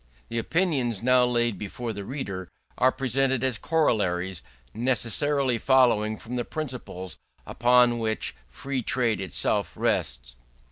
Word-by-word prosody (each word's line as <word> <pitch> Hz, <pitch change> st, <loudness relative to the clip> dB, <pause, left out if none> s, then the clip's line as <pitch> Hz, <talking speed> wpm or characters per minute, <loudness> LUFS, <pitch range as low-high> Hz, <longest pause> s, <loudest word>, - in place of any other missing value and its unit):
The 115 Hz, 0 st, -1 dB
opinions 130 Hz, -, 0 dB
now 125 Hz, 0 st, +5 dB
laid 120 Hz, -5 st, 0 dB
before 115 Hz, +3 st, -5 dB
the 100 Hz, -1 st, -6 dB
reader 95 Hz, -7 st, -5 dB, 0.3 s
are 130 Hz, -, +3 dB
presented 130 Hz, 0 st, 0 dB
as 130 Hz, -5 st, 0 dB
corollaries 95 Hz, -, 0 dB, 0.3 s
necessarily 125 Hz, +2 st, +1 dB
following 115 Hz, -5 st, +3 dB
from 125 Hz, +1 st, -6 dB
the 120 Hz, -, 0 dB
principles 125 Hz, -, -6 dB, 0.3 s
upon 120 Hz, 0 st, +3 dB
which 110 Hz, -1 st, -1 dB, 0.2 s
Free 130 Hz, -, -4 dB
Trade 120 Hz, -4 st, +1 dB
itself 95 Hz, -, -1 dB
rests. -, -, -1 dB
120 Hz, 125 wpm, -26 LUFS, 105-130 Hz, 0.3 s, now